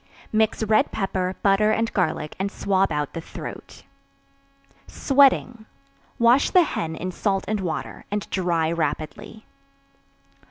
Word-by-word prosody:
Mix 220 0 +1
red 215 0 +2
pepper, 190 -2 -2
butter 200 +1 +4
and 225 +1 0
garlic 155 -5 -1
and 195 +1 -1
swab 195 -2 +1
out 150 -1 -2
the 165 - -5
throat. - - -9 1.0
Sweating. 260 -5 +2 0.5
Wash 240 +4 +4
the 365 - +5
hen 160 - -3
in 185 +3 -4
salt 195 +1 -1
and 215 0 -1
water, 180 -4 -5
and 205 0 -3
dry 170 -4 0
rapidly. 160 +6 -4
195 Hz, 125 wpm, -23 LUFS, 170-220 Hz, 1.0 s, the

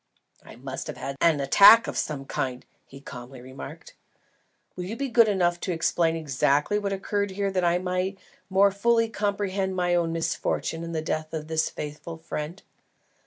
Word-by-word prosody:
"I - - -13
must - - -6
have - - -6
had 140 - -5
an 165 -3 +4
attack 200 +11 +8
of - - -5
some 140 -3 -3
kind," 130 -3 -3 0.2
he 135 - -12
calmly 125 -1 -10
remarked. 130 +2 -10 0.8
"Will 180 - -5
you 210 +5 -5
be 275 +2 -3
good 235 -2 +5
enough 175 -4 +1
to 185 - -3
explain 165 0 +1
exactly 150 +5 +1
what 200 -1 -3
occurred 200 +1 -1
here 195 +1 -2
that 185 -1 0
I 175 0 +3
may 185 +2 -2 0.3
more 195 +1 +4
fully 230 +3 +2
comprehend 200 -3 -1
my 180 -1 +1
own 170 -1 +1
misfortune 165 0 -2
and 170 0 -5
the 155 - -2
death 155 0 -3
of 155 -1 -5
this 160 0 0
faithful 150 +2 -7
friend?" 160 +2 -6
175 Hz, 175 wpm, -26 LUFS, 155-195 Hz, 0.8 s, attack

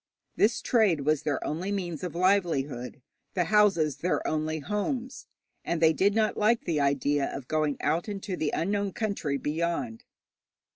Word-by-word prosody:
This 225 +3 +2
trade 210 - +3
was 150 +1 +1
their 145 -3 -2
only 175 +6 -3
means 175 -6 -3
of 180 -2 -4
livelihood, 155 -10 0 0.3
the 180 - +2
houses 195 -7 +3
their 180 - -1
only 155 0 -1
homes, 210 - -3 0.4
and 170 - -1
they 160 0 +5
did 200 +5 +2
not 220 -1 +2
like 225 +2 +2
the 165 -4 0
idea 140 0 +1
of 135 -2 -7
going 155 -2 0
out 170 +6 0
into 195 -2 -4
the 155 -4 -1
unknown 200 +3 -1
country 200 -10 -2
behind. 150 -7 -2
170 Hz, 155 wpm, -28 LUFS, 150-200 Hz, 0.4 s, they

